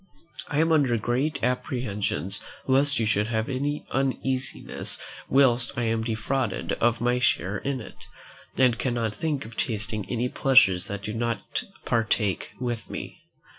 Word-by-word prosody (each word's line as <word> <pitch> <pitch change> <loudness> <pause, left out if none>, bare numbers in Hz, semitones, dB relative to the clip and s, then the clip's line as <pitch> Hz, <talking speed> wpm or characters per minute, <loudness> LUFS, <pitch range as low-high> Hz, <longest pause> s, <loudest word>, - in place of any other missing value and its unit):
I 145 - -2
am 165 +1 +3
under 140 -7 +4
great 125 +7 -1
apprehensions 105 - -1 0.2
lest 140 +2 +3
you 115 - +1
should 105 0 +2
have 110 -1 -1
any 145 +3 -2
uneasiness 135 0 -1 0.3
whilst 130 -2 +4
I 120 - +1
am 115 0 +1
defrauded 115 +1 -1
of 120 0 +3
my 120 +1 +2
share 100 -5 +1
in 135 -1 -2
it, 110 - -11 0.5
and 125 -3 +4
cannot 120 -4 0
think 145 +3 -2
of 110 0 -10
tasting 110 -2 -2
any 120 0 0
pleasures 110 -9 +4
that 100 0 -5
you 105 - -3
do 115 - -3
not 115 -4 -2 0.2
partake 110 -4 +1
with 120 -3 -3
me. - - -6
120 Hz, 150 wpm, -26 LUFS, 110-130 Hz, 0.5 s, under